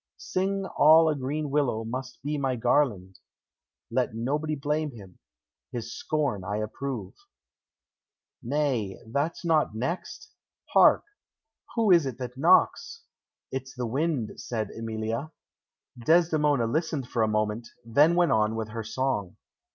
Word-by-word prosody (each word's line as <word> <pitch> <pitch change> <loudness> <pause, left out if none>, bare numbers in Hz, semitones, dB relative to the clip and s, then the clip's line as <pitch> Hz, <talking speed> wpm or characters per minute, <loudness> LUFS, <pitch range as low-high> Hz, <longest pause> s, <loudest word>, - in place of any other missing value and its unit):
"Sing 195 +1 -2
all 160 -2 +6
a 155 - +1
green 145 +2 -3
willow 135 -6 +1
must 130 +3 -6
be 150 +2 -2
my 135 -3 0
garland; 105 -7 +1 0.7
Let 125 -2 0
nobody 150 +7 -1
blame 150 +2 -1
him, 95 -5 -13 0.5
his 115 -1 -5
scorn 145 - -1
I 105 +2 -3
approve. 110 -1 -4 1.3
"Nay, 125 -7 -1
that's 145 +9 -2
not 155 -9 +2
next. 130 +11 -4 0.4
Hark! - - +6 0.7
Who 225 -4 +3
is 170 -5 +5
it 125 -3 -5
that 125 -1 -6
knocks?" 455 - +3 0.5
"It's 130 0 -5
the 125 -1 -3
wind," 135 -1 -1
said 110 -4 -3
Emilia. 115 +5 -4 0.7
Desdemona 155 -5 +3
listened 150 +1 -1
for 120 - -1
a 110 - +3
moment, 110 +2 -1 0.2
then 145 +9 +4
went 175 -1 +3
on 110 0 +2
with 110 -1 -3
her 115 +1 -5
song. 110 -5 -2
130 Hz, 130 wpm, -27 LUFS, 110-155 Hz, 1.3 s, all